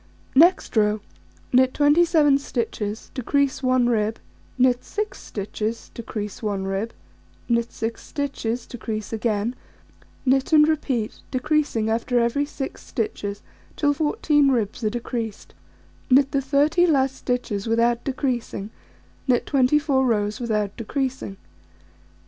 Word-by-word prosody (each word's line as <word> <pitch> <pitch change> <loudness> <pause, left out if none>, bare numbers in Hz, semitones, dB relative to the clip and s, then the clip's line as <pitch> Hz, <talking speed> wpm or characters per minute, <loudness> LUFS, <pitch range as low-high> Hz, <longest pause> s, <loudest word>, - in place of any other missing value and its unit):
Next 335 +3 +4
row: 210 0 +3 0.5
Knit 255 +1 +4
27 295 -1 +4
stitches, 225 -5 -4
decrease 275 +1 0
1 255 -2 +3
rib; 220 -2 +1 0.4
knit 250 -1 +3
6 425 0 -4
stitches, 215 +2 -4
decrease 210 -3 -6
1 205 -3 -2
rib; 195 +4 -2 0.6
knit 235 -1 +1
6 225 +1 -4
stitches, 250 -5 -3
decrease 220 -3 -5
again; 220 0 0 0.7
knit 270 +3 +2
and 300 -1 +7
repeat, 270 -8 -1
decreasing 280 -4 0
after 230 +2 0
every 235 +5 +1
6 275 -2 -6
stitches, 205 -3 -4 0.3
till 290 -1 +2
14 295 -1 +2
ribs 230 -2 -1
are 215 - +2
decreased; 230 -2 -5 0.6
knit 270 +2 +5
the 275 - +1
30 295 +6 +3
last 270 -4 +2
stitches 245 -6 -2
without 235 +1 +2
decreasing; 250 -6 -2 0.6
knit 245 -2 +2
24 275 0 +3
rows 210 -4 0
without 210 -4 -1
decreasing. 260 -3 -3
245 Hz, 120 wpm, -23 LUFS, 220-280 Hz, 0.7 s, and